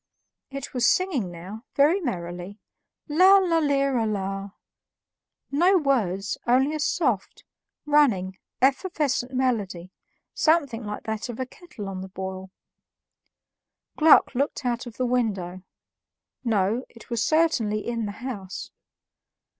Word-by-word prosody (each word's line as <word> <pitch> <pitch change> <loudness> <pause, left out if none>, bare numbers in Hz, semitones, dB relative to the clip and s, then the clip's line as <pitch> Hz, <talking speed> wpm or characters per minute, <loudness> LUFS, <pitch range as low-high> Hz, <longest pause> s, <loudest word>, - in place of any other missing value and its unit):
It 275 +1 -7
was 245 -2 +2
singing 315 - +1
now, 185 +6 -9
very 300 +7 +4
merrily, 180 - -5 0.5
"Lala 365 +1 +5
lira 275 -6 +1
la" 195 -1 -3 1.0
no 355 +7 +4
words, 210 - 0
only 265 +5 +3
a 310 - -3
soft, 255 - -1 0.4
running, 230 -11 +2 0.2
effervescent 270 -3 +1
melody, 210 -9 -1 0.4
something 285 -8 +2
like 210 0 -5
that 220 +2 -4
of 240 - -6
a 260 - -1
kettle 255 - -10
on 190 -1 -5
the 190 - -6
boil. 190 0 -6 1.5
Gluck 310 -2 +6
looked 275 +1 -1
out 240 +1 -1
of 230 - -10
the 255 - 0
window; 200 -8 -1 0.8
no, 220 +1 +1
it 230 +1 -16
was 235 -2 0
certainly 260 -10 +1
in 230 -2 -2
the - - -4
house. 195 -8 -6
240 Hz, 120 wpm, -25 LUFS, 195-285 Hz, 1.5 s, Gluck